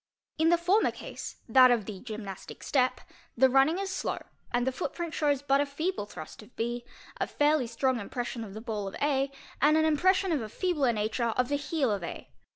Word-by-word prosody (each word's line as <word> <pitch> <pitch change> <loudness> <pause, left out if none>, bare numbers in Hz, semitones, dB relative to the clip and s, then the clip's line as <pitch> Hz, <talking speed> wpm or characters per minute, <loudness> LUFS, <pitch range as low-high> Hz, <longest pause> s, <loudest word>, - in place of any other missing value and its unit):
In 320 +1 +4
the 345 - +5
former 365 +6 +3
case, - - -7
that 255 +2 +7
of 235 -4 +2
the 200 -2 -6
gymnastic 210 -5 -8
step, 255 -2 +1 0.4
the 260 +1 +5
running 270 +6 +4
is 390 0 -3
slow - - -2 0.3
and 245 0 +1
the 265 - +1
footprint 340 +3 -4
shows 285 -2 +1
but 275 0 +3
a - - +1
feeble 310 - -2
thrust 160 -1 -9
of 215 +3 -17
B, 240 +1 -2 0.3
a - - -1
fairly 295 -3 +2
strong 245 +2 0
impression 240 +2 -4
of 200 -2 -9
the 215 - -6
ball 215 -4 -3
of 195 - -6
A, 275 -1 +1 0.3
and 300 +2 +5
an 315 - +3
impression 370 +5 +3
of 300 -5 +1
a 220 - -5
feebler 300 - +1
nature 215 +2 -1
of 245 +2 0
the 285 - +1
heel 285 -3 0
of 200 -3 -2
A. - - -7
260 Hz, 210 wpm, -29 LUFS, 225-305 Hz, 0.4 s, that